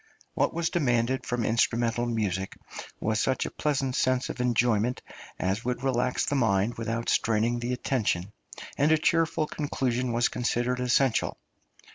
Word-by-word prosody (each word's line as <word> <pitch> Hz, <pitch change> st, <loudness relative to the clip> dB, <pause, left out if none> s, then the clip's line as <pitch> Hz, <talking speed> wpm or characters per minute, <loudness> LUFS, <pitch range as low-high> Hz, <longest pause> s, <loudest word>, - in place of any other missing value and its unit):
What -, -, +1 dB
was 170 Hz, 0 st, -1 dB
demanded 130 Hz, -5 st, +1 dB
from 120 Hz, -2 st, -1 dB
instrumental 115 Hz, +1 st, +1 dB
music 100 Hz, -5 st, -2 dB, 0.4 s
was 110 Hz, 0 st, 0 dB
such 130 Hz, +4 st, +1 dB
a -, -, -5 dB
pleasant 135 Hz, -3 st, -1 dB
sense 130 Hz, -1 st, +1 dB
of -, -, -4 dB
enjoyment 120 Hz, -1 st, +1 dB, 0.3 s
as 95 Hz, +3 st, 0 dB
should 125 Hz, +1 st, -3 dB
relax 125 Hz, -1 st, +1 dB
the -, -, -1 dB
mind 110 Hz, -4 st, +2 dB
without 115 Hz, 0 st, -3 dB
straining 115 Hz, +2 st, +1 dB
the 120 Hz, +1 st, -3 dB
attention, 105 Hz, -7 st, -1 dB, 0.5 s
and 145 Hz, +2 st, +4 dB
a 160 Hz, -, +5 dB
cheerful 160 Hz, 0 st, +1 dB
conclusion 130 Hz, -5 st, -2 dB
was 120 Hz, +1 st, +2 dB
considered 125 Hz, +1 st, -1 dB
essential. 125 Hz, 0 st, +1 dB
120 Hz, 145 wpm, -27 LUFS, 115-130 Hz, 0.5 s, a